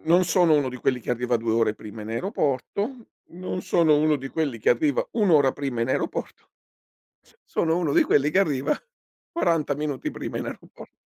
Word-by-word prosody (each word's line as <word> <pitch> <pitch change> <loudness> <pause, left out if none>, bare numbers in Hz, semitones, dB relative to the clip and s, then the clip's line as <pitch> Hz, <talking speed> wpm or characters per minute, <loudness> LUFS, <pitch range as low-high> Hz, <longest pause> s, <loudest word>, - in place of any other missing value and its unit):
non 170 +3 +4
sono 175 -1 +4
uno 145 -3 +2
di 125 - -6
quelli 125 0 0
che - - -5
arriva 125 0 0
2 115 0 -1
ore 110 -1 +2
prima 110 0 -9
in 105 - -7
aeroporto, 200 - -2 0.2
non 180 +1 -5
sono 160 -3 +3
uno 155 0 +3
di 135 -1 -7
quelli 145 -7 -2
che - - 0
arriva 140 +3 +2
1 210 -5 +2
ora 140 -5 +5
prima 135 -5 -4
in 115 - 0
aeroporto - - -3 1.0
sono 165 +1 +1
uno 155 -5 0
di - - +6
quelli 145 +1 +2
che 185 - +3
arriva 145 -6 0 0.5
40 165 - +1
minuti 145 -2 -3
prima - - -6
in - - -3
aeroporto. - - -10
145 Hz, 190 wpm, -25 LUFS, 125-170 Hz, 1.0 s, di